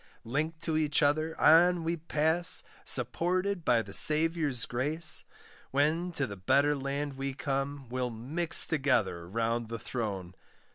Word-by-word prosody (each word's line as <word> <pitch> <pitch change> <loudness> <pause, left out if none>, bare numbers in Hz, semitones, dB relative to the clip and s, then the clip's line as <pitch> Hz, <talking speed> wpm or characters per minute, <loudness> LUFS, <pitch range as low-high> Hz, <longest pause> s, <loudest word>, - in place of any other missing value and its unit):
Linked 155 +6 -3
to 160 -2 -2
each 150 -1 +1
other, 155 +3 0
on 170 +2 +5
we 165 +1 -1
pass, 160 +1 +1 0.2
Supported 185 +2 -1
by 120 -6 +2
the 100 -1 -11
Saviour's 155 -4 +3
grace; 150 +7 -2 0.4
When 155 +6 0
to 145 -4 -1
the 100 -5 -8
better 140 +10 +2
land 140 0 -4
we 135 0 -4
come, 140 0 -3
We'll 125 +1 -3
mix 140 +10 +3
together 130 - -1
round 115 +2 -2
the 115 - -4
throne. 100 -7 -5
145 Hz, 140 wpm, -29 LUFS, 125-160 Hz, 0.4 s, on